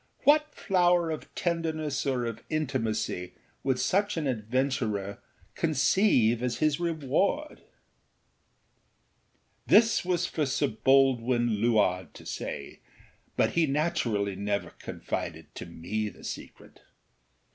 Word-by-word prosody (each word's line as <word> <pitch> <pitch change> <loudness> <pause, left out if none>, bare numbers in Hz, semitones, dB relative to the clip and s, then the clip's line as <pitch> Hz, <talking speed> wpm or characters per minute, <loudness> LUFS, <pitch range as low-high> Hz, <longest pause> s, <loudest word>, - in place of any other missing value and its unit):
What 300 +1 +4
flower 175 -3 +2
of 155 - -6
tenderness 160 -4 -1
or 125 -3 0
of 115 -1 -5
intimacy 115 - -2 0.3
would 130 -2 +1
such 195 +9 +1
an 160 - -1
adventurer 115 -4 -1 0.3
conceive 130 - +3
as 125 -1 -1
his 155 0 +1
reward? 170 - -1 2.1
This 225 0 +5
was 180 -1 0
for 155 -4 -1
Sir 130 - +1
Baldwin 120 -2 +3
Luard 100 -7 +1
to - - -12
say; - - -6 0.6
but - - +3
he 170 -2 +2
naturally 120 - 0
never 100 +1 -2
confided - - -6
to - - -8
me 105 +6 -3
the - - -16
secret. - - -9
135 Hz, 110 wpm, -28 LUFS, 110-165 Hz, 2.1 s, This